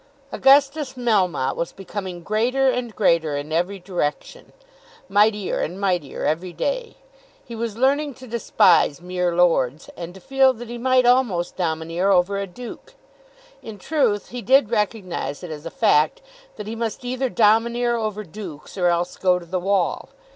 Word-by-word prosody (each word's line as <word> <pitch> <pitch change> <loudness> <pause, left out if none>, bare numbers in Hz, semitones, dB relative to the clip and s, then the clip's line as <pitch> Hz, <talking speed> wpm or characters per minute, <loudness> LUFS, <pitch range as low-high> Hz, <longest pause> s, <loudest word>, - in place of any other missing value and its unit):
Augustus 275 0 +3
Melmotte 200 - +1
was 170 - -3
becoming 190 -2 -7
greater 245 +7 +1
and 240 -3 -4
greater 165 -7 +2
in 145 +2 -6
every 175 +5 0
direction, 180 - -4 0.6
mightier 205 0 +2
and 180 +4 -3
mightier 180 -7 -1
every 170 +4 -1
day. - - -3 0.5
He 235 - -9
was 225 -1 -4
learning 280 +2 +1
to 260 - -12
despise 185 - +3
mere 180 -1 -2
lords, 160 -5 +1
and 175 +1 -8
to - - -11
feel 265 +5 +3
that 240 -1 -10
he 240 0 -6
might 255 0 +3
almost 240 -9 +2
domineer 165 +2 -1
over 195 +1 +2
a 200 - -3
duke. 240 +6 -10 0.7
In 220 -2 -9
truth 230 -4 0
he 245 0 -6
did 260 -2 +4
recognise 205 -8 -2
it 175 - -7
as 155 +1 -7
a - - -4
fact 150 - +2 0.3
that 210 - -7
he 220 +2 -5
must 230 +2 -4
either 255 +1 -1
domineer 235 +2 +2
over 215 -2 -3
dukes, 185 -2 -9
or 180 - +3
else 175 +1 0
go 180 -1 +3
to 175 - -9
the 180 +2 -2
wall. 190 0 0
200 Hz, 160 wpm, -22 LUFS, 175-240 Hz, 0.7 s, did